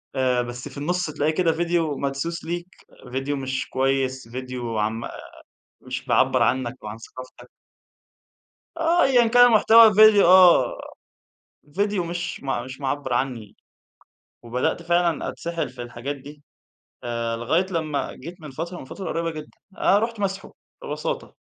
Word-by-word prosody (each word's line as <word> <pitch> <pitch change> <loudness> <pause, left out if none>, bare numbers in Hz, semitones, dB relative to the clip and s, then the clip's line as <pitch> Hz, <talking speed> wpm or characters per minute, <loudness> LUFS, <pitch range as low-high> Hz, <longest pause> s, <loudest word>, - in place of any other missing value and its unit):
آآ، 125 -2 +2
بس 120 0 -6
في - - -13
النُصّ 175 +5 -1
تلاقي 155 0 -1
كده 165 +1 +2
فيديو 165 -3 0
مدسوس 140 +5 -3
ليك، 175 +1 -4 0.4
فيديو 135 +3 -2
مش 130 0 -3
كويِس، 130 -1 -1
فيديو 125 -1 -5
عن 105 +1 0
م - - -6
آآ، - - -7 0.7
مش - - -6
بيعبّر - - +3
عنك 130 0 -1
وعن 105 +1 -7
ثقافتَك. 130 +2 -12 1.3
آه، 330 +1 +3
أيًا 245 -3 +4
كان 245 +2 +7
المحتوى 230 0 +7
الفيديو، 215 -1 +6
آه، 180 -8 +6 1.0
فيديو 200 -1 0
مش 175 0 -5
م 135 -3 -2
مش 130 +1 -9
معبِّر 135 -1 -2
عنِّي. 120 -4 -3 0.9
وبدأت 125 +7 -2
فعلًا 170 -1 +1
أتسحَّل 170 -3 -4
في 125 0 -9
الحاجات 120 +4 -6
دي. 145 +2 -13 0.6
آآ، 115 -1 -2
لغاية 160 +11 0
لمَّا 155 -5 -2
جيت 170 +6 -10
من 150 -2 -9
فترة، 165 +6 -6
من - - -9
فترة 185 +7 -7
قريبة 165 0 -2
جدًا، 155 -2 -8 0.3
آآ، 200 - +4
رُحت 225 0 -3
ماسحه 195 -1 -3 0.3
ببساطة. - - -4
150 Hz, 150 wpm, -23 LUFS, 130-180 Hz, 1.3 s, كان